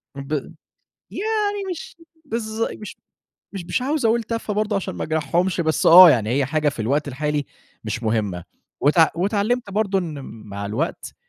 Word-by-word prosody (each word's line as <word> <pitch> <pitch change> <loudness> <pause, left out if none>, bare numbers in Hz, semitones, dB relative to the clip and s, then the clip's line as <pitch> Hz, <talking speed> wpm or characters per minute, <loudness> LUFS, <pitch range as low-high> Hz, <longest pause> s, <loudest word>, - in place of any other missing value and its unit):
ب 140 +2 -6 0.8
يعني 415 -1 -1
مش 350 - -8 0.3
بالض 225 -3 -3
مش 210 - -9 0.6
مش 185 -3 -6
مش 250 - -1
عاوز 280 0 -1
أقول 225 +1 +2
تافهة 230 -2 -3
برضه، 210 0 0
عشان 195 - -3
ما - - -4
أجرحهُمش، 165 +4 0
بس 160 -1 0
آه، 175 +1 +10
يعني 110 -6 +2
هي 135 +3 +1
حاجة 150 +1 +1
في 140 - -10
الوقت 145 +7 0
الحالي 145 +1 -2 0.4
مش 115 - -4
مهمة، 105 -6 -1 0.4
واتع 160 +3 +5
واتعلمت 205 +6 0
برضه 200 -1 0
إن 160 -5 -5
مع 100 -2 -8
الوقت، 120 - -3
170 Hz, 160 wpm, -22 LUFS, 140-220 Hz, 0.8 s, آه